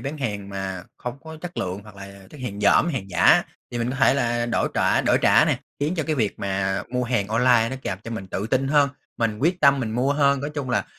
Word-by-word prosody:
bán 145 +3 -5
hàng 105 -7 -4
mà 95 -2 -5 0.2
hông 125 +2 -6
có 160 0 -8
chất 175 +1 -8
lượng 95 +2 -3
hoặc 105 -1 -14
là 100 0 -11
chất 150 - -12
hàng 105 -5 -5
dỏm, 105 +10 +4
hàng 125 - -4
giả, - - +5 0.3
thì 120 - -4
mình 120 +1 -1
có 130 - -4
thể 135 0 +4
là 120 -3 0
đổi 120 - 0
trả - - +2
đổi - - +2
trả - - +6
này, - - 0 0.2
khiến 150 +5 0
cho 160 - 0
cái 155 - 0
việc 110 -8 -1
mà 95 0 -1
mua 125 0 -1
hàng 120 -5 -1
online 115 0 +3
nó 130 - -4
càng 95 - -3
cho 115 - -6
mình 110 -4 -5
tự 95 +2 -4
tin 130 +3 0
hơn, 145 -1 +4 0.3
mình 110 -2 -1
quyết 170 +8 +1
tâm 140 -2 +5
mình 115 -3 -2
mua 125 +5 +1
hơn. 140 -2 +2
Nói 145 +2 -4
chung 140 -4 -3
là 120 - +1
120 Hz, 260 wpm, -23 LUFS, 100-140 Hz, 0.3 s, trả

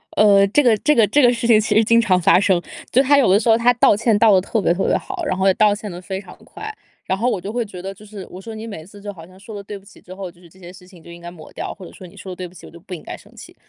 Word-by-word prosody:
呃， 200 -2 +5
这 290 +9 +2
个 235 -4 +4
这 300 +8 +2
个 225 -4 +4
这 285 +9 +3
个 245 -2 +5
事 235 0 -3
情 220 -2 +5
其 210 -1 -1
实 220 - +5
经 230 +1 +4
常 190 -6 +2
发 175 - +5
生， 190 -3 +2 0.3
就 255 - +4
他 280 +1 +3
有 265 - +3
的 200 - +5
时 230 +1 -1
候 225 - +5
他 245 +1 +3
道 230 - +4
歉 220 0 +1
道 220 -1 +5
得 185 - +4
特 215 +2 -2
别 170 - +2
特 190 - -2
别 - - +1
好， - - -7
然 185 - -2
后 190 +1 +1
也 190 - +5
道 210 -1 +3
歉 210 0 -7
得 175 - -8
非 190 +1 -5
常 195 - -14
快。 435 +1 -9 0.3
然 190 - -1
后 245 +3 +1
我 200 - -2
就 200 - -6
会 240 0 -2
觉 185 -4 -10
得 195 +1 -6
就 210 +2 -17
是 205 -3 -10
我 180 - -10
说” 220 +3 -9
你 220 - -8
每 200 -8 -9
次 200 +2 -15
就 205 0 -6
好 165 -4 -13
像 185 +1 -18
说 210 +2 -11
了 200 - -6
对 205 +1 -8
不 195 - -19
起 205 - -18
之 185 - -13
后， 190 -2 -7
就 175 - -25
是 175 - -17
这 185 - -23
些 175 -1 -11
事 180 0 -16
情 175 -4 -18
就 170 - -13
应 170 - -12
该 175 - -8
抹 160 -3 -14
掉， - - -6
“或 190 - -11
者 - - -12
说” 185 - -13
你 170 - -18
说 190 - -9
了 - - -7
对 180 0 -7
不 175 - -19
起 - - -14
我 - - -13
就 170 - -14
不 185 +2 -11
应 165 - -8
该 - - -8
生 - - -20
气。 - - -13
200 Hz, 400 characters per minute, -19 LUFS, 185-225 Hz, 0.3 s, 呃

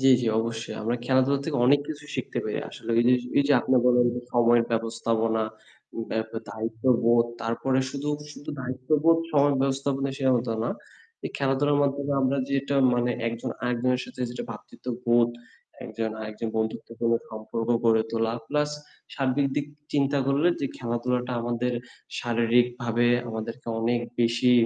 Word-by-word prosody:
জ্বি, 135 0 +5
জ্বি 120 - +1
অবশ্যই। 115 0 -4
আমরা 115 +2 0
খেলাধুলা 130 +2 +3
থেকে 155 -3 -1
অনেক 140 +2 +5
কিছু 150 -1 -6
শিখতে - - -3
পারি। - - -2
আসলে 115 - -7
অইজিস 125 +1 +4 0.2
এইযে 140 0 +4
আপনি 130 - +1
বললেন 125 0 +5
যে 125 - -3
সময়ের 120 -1 +4
ব্যবস্থাপনা, 115 0 0 0.7
ব্যাপ 110 0 -2 0.2
দায়িত্ববোধ 115 +1 +2 0.2
তারপরে 130 +3 0
শুধু 140 +2 -4 0.2
শুধু 145 - -13
দায়িত্ববোধ 145 +6 +2
সময়ের 145 -1 +4
ব্যবস্থাপনা 135 0 0
সে 135 - 0
হতো 120 -1 0
না। 115 - -1 0.5
এই - - -3
খেলাধুলার 140 +1 +2
মাধ্যমে 140 0 0
আমরা 130 +1 +2
যেটা 140 0 0 0.2
মানে 120 0 +1 0.2
একজন 115 0 -4
আরেকজনের 125 +1 +1
সাথে - - -11
যেটা 125 - -5
ভ্রাতৃত্ববোধ 120 +1 0 0.6
একজন 115 -1 -3
আরেকজন 110 +1 -4
বন্ধুত্বপূর্ণ 115 +1 -1 0.2
সম্পর্ক 110 +1 -5 0.2
গড়ে 110 -1 +5
তোলা। 115 0 0 0.2
প্লাস 150 0 +1 0.4
সার্বিক 140 0 +1
দিক 145 - 0 0.3
চিন্তা 140 0 +2
করলে 140 +5 +3
যে 140 - 0
খেলাধুলাটা 125 +1 -1
আমাদের 120 +1 -1 0.5
শারীরিক 120 0 +3 0.2
ভাবে 120 0 +2 0.2
আমাদেরকে 115 +2 -6
অনেক 120 +1 +1 0.2
বেশি 120 +1 +3
125 Hz, 145 wpm, -26 LUFS, 115-135 Hz, 0.7 s, জ্বি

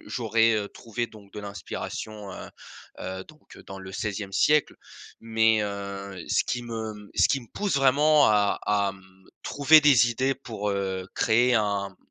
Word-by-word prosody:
j'aurais, 115 -1 +2
heu, 100 -1 -2
trouvé, 120 +1 -5
donc 100 -3 -16
de - - -8
l'inspiration, 100 +1 -7
heu - - -9 0.5
heu, 95 0 -5
donc, 155 0 -18
heu, - - -13
dans 95 0 -9
le 95 0 -10
16e 100 -1 -4
siècle. 150 +9 +3 0.5
Mais, 110 -1 +2
heu, 100 -2 -6
ce - - +2
qui 120 0 -3
me 110 -3 -6
ce - - +4
qui 135 - +1
me 120 - -14
pousse 205 -7 -1
vraiment 145 +2 +5
à 105 -1 +2
à, 100 -1 +1
mmh, 95 0 -20 0.2
trouver 155 +2 +5
des 130 -5 +5
idées 130 +3 0
pour 110 -6 -5
heu, 95 -2 -3
créer 120 +2 +3
un 100 -3 -1
110 Hz, 170 wpm, -26 LUFS, 100-120 Hz, 0.5 s, vraiment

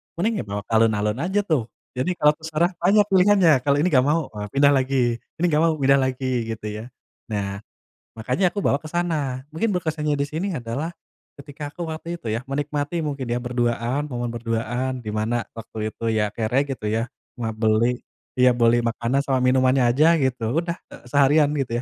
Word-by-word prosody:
mending 210 +5 0
ya - - -2
bawa 100 0 -4
alun-alun 110 0 +2
aja 190 +6 0
tuh. 150 - 0 0.2
Jadi, 155 +8 -2
kalau 150 -2 +5
terserah, 160 +3 0
banyak 200 +4 +5
pilihannya. 190 -2 +5 0.2
Kalau 140 - +4
ini 180 - +3
nggak 130 -3 +4
mau 155 -2 0
e 105 - -9
pindah 140 +6 +4
lagi. 130 -3 +1 0.2
Ini 175 - 0
nggak 150 - +3
mau, 165 0 +3
pindah 140 -1 +3
lagi, 130 0 -4 0.3
gitu 110 - -12
ya. 105 +1 -6 0.4
Nah, 100 -3 -3 0.6
makanya 125 - +1
aku 200 +2 -4
bawa 140 - +2
ke 155 - -9
sana. 150 -7 -2
Mungkin 195 +4 0
berkesannya 155 -3 -1
di 140 - 0
sini 160 +4 -3
adalah 120 +7 -3 0.5
ketika 145 +1 -9
aku 175 - -6
waktu 165 +2 -5
itu 120 -10 -5
ya, 115 +4 -3
menikmati 145 +3 -2
mungkin 140 -4 -3
ya, 120 +1 -2
berduaan, 120 +3 -1
momen 120 -3 -3
berduaan, 120 +2 -2
di 110 - -5
mana 110 +3 -1
waktu 110 -1 -5
itu 115 - -6
ya 105 -1 +1
kere, 120 +5 +1
gitu 135 -6 -5
ya. 115 +3 -1 0.3
Ma 115 -3 -2
beli, 110 +2 +1 0.4
ya 125 0 +6
beli 120 0 +4
makanan 115 +3 0
sama 130 -2 +1
minumannya 130 0 +3
aja, 155 +7 +5
gitu. 130 -3 -1
Udah 170 +1 -2
e - - -11
seharian 145 +1 +4
gitu 125 -3 -3
130 Hz, 185 wpm, -23 LUFS, 115-155 Hz, 0.6 s, ya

